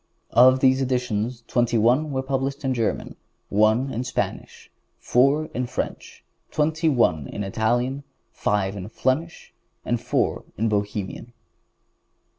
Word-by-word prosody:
Of 130 +2 +6
those 130 0 +4
editions, 125 -2 -1
twenty 120 -1 +1
one 125 +8 +3
were 130 -2 -2
published 135 +1 -2
in 130 - +1
German, 115 -3 -2 0.3
one 110 +6 +3
in 120 - -2
Spanish, 130 - -4 0.3
four 140 +5 +2
in 125 0 -2
French, - - -5 0.3
twenty 160 +2 +1
one 80 - +2
in 105 - -5
Italian, 120 +7 0 0.3
five 100 -1 -1
in 95 0 -6
Flemish 150 +8 -2 0.3
and - - -1
four - - 0
in 110 +1 +1
Bohemian. 105 +2 -3
125 Hz, 125 wpm, -24 LUFS, 110-135 Hz, 0.3 s, Of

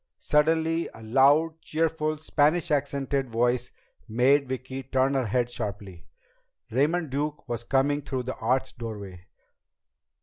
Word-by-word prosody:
Suddenly 160 +2 +1
a 115 - -12
loud, 145 +8 +3
cheerful 155 -1 -1
Spanish 155 +2 +1
accented 140 -2 0
voice 120 +2 0 0.4
made 130 +4 +3
Vicki 130 +1 -4
turn 135 +1 +1
her 130 -3 0
head 120 +3 +1
sharply. 100 -7 -6 0.6
Raymond 150 +5 +1
Duke 145 +1 -3
was 120 -1 -3
coming 140 +3 +1
through 130 -2 -3
the 130 +1 -5
arched 130 +2 -1
doorway. 100 -6 -7
135 Hz, 125 wpm, -26 LUFS, 120-150 Hz, 0.6 s, loud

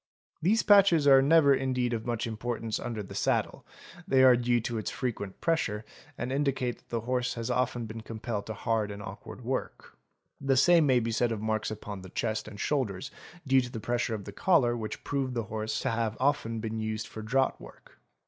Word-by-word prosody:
'These 210 +7 +3
patches 195 -7 +6
are 135 -1 +8
never 145 0 +5
indeed 130 -2 0
of 115 0 -3
much 120 -2 -1
importance 115 0 -3
under 110 -3 -4
the 95 - -10
saddle, - - 0 0.4
they 130 -6 +4
are 130 -1 +8
due 120 0 +2
to 115 0 -3
its 110 - -3
frequent 110 -7 -4
pressure 110 -11 0 0.3
and 125 +2 -3
indicate 135 -3 0
that - - -32
the 115 -1 -2
horse 125 +1 -1
has 115 +1 -3
often 125 -1 0
been 110 +1 -7
compelled 110 -1 -5
to 110 - -5
hard 110 -3 0
and 100 0 -7
awkward 100 +6 -9
work; 130 +1 -4 0.4
the 135 -1 +1
same 165 +2 +5
may 130 -2 +4
be 115 0 -2
said 120 +1 +1
of 110 - -2
marks 110 0 -1
upon 105 -2 -7
the 95 - -10
chest 110 +4 -2
and 105 -2 -10
shoulders 130 -1 -1 0.3
due 135 -1 +4
to 125 - -6
the 115 - -5
pressure 120 0 -1
of 100 - -7
the 100 - -7
collar 125 - +3
which 110 -2 -5
prove 135 -3 -2
the 115 - -1
horse 110 0 -2
to 130 - 0
have 115 -1 -1
often 130 -4 0
been 110 0 -4
used 110 0 -3
for 110 - -8
draught 130 +5 0
work. - - -15
120 Hz, 205 wpm, -29 LUFS, 110-130 Hz, 0.4 s, are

